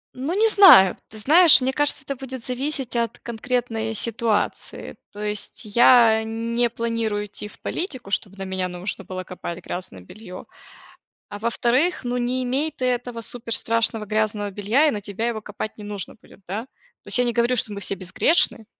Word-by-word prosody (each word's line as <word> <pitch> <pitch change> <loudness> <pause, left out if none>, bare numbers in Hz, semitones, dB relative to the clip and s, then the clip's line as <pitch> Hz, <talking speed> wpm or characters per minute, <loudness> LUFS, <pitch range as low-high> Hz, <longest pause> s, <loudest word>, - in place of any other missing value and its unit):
Ну, 270 +7 -3
не 440 +2 +4
знаю, 370 - +8
ты 220 - -12
знаешь, 315 - +7
мне 260 0 -1
кажется, 290 -1 +2
это 275 0 -4
будет 260 -2 -8
зависеть 265 0 -3
от 235 -1 -1
конкретной 230 -1 -3
ситуации, 230 -1 -2 0.2
то 205 - -12
есть 210 +2 -3
я 225 0 +5
не 230 +2 -1
планирую 230 -2 -2
идти 205 0 -8
в - - -17
политику, 260 - -5
чтобы 200 -1 -2
на 195 - -6
меня 190 -1 -2
нужно 180 +2 -6
было 185 0 -6
копать 180 -1 -8
грязное 175 - -6
белье, 185 - -11 0.8
а 205 - -8
во-вторых, 245 - 0
ну, 245 0 -2
не 250 +1 -1
имей 270 +5 -1
ты 255 - -4
этого 245 -1 -2
супер 230 0 -7
страшного 225 -1 +1
грязного 210 -1 -1
белья, 210 +9 +1
и - - +3
на 210 -5 -5
тебя 205 +3 -4
его 220 -2 -4
копать 215 +1 -6
не 210 - -10
нужно 205 0 -6
будет, - - -19
да. 205 +4 -3 0.4
То - - -15
есть - - 0
я 245 - +3
не 240 -1 -1
говорю, 240 +1 +2
что 215 - -1
мы 200 - -6
все 195 - -2
безгрешны. 215 - +1
230 Hz, 185 wpm, -22 LUFS, 205-250 Hz, 0.8 s, знаю